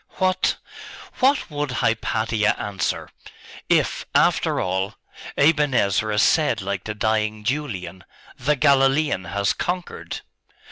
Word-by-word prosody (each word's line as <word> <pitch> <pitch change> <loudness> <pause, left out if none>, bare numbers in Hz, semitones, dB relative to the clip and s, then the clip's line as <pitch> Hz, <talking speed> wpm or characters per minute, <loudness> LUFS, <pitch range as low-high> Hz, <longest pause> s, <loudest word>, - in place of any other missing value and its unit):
'What 185 0 +2 0.6
what 265 - +2
would 145 -1 -2
Hypatia 110 -2 0
answer 100 -2 -3 0.6
if, - - +1
after - - +3
all, 95 +2 -1 0.4
Aben 150 -2 +3
Ezra 105 +1 +1
said - - +3
like 100 0 -4
the 105 - -4
dying 110 0 0
Julian, 110 -9 -3 0.3
"The 150 +5 +1
Galilean 135 -5 +3
has 100 +3 0
conquered"? 180 0 -4
110 Hz, 105 wpm, -23 LUFS, 100-145 Hz, 0.6 s, after